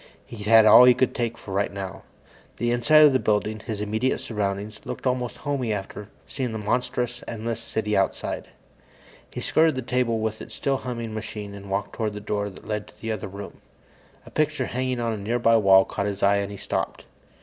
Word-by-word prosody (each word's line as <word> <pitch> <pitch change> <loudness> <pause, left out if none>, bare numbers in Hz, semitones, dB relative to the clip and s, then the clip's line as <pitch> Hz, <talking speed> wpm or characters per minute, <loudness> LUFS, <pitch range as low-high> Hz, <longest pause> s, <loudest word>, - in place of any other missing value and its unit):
He'd 105 -3 -8
had 110 0 +7
all - - +9
of 125 - +10
that - - +8
he - - +7
could 130 - +1
take 115 -2 -2
for 95 - -9
right 100 +1 0
now. 100 -1 -6 0.6
The 120 0 0
inside 150 +6 +6
of 145 - +5
the 130 - +3
building, 110 0 0
his 110 -1 -5
immediate 110 +5 0
surroundings, 105 0 -3
looked - - -7
almost 125 -2 -1
homey 140 -6 -2
after 105 0 -5 0.2
seeing 125 -4 -3
that - - -3
monstrous, 120 +3 -2
endless 115 0 -4
city 110 -2 -2
outside. 95 - -1 0.8
He - - -6
skirted 160 -2 +3
the 130 - -3
table 125 -2 0
with 110 0 -3
its - - -9
still 135 -1 0
humming 120 -3 -5
machine 105 -2 -6
and 100 0 -10
walked 100 +1 -2
toward 110 -2 -2
the 105 - -6
door 105 0 -2
that 95 - -14
led 105 -1 -3
to 105 - -19
the 115 +1 -3
other 105 -2 -4
room. 100 +1 -9 0.6
A - - -13
picture 150 -3 0
hanging 130 0 -2
on 115 -1 -1
a - - -4
nearby 115 +3 +2
wall 95 -2 +6
caught 100 - -3
his 100 -1 -4
eye, 100 0 +5
and 100 0 -2
he 100 - -7
stopped. - - -3
110 Hz, 215 wpm, -25 LUFS, 105-125 Hz, 0.8 s, of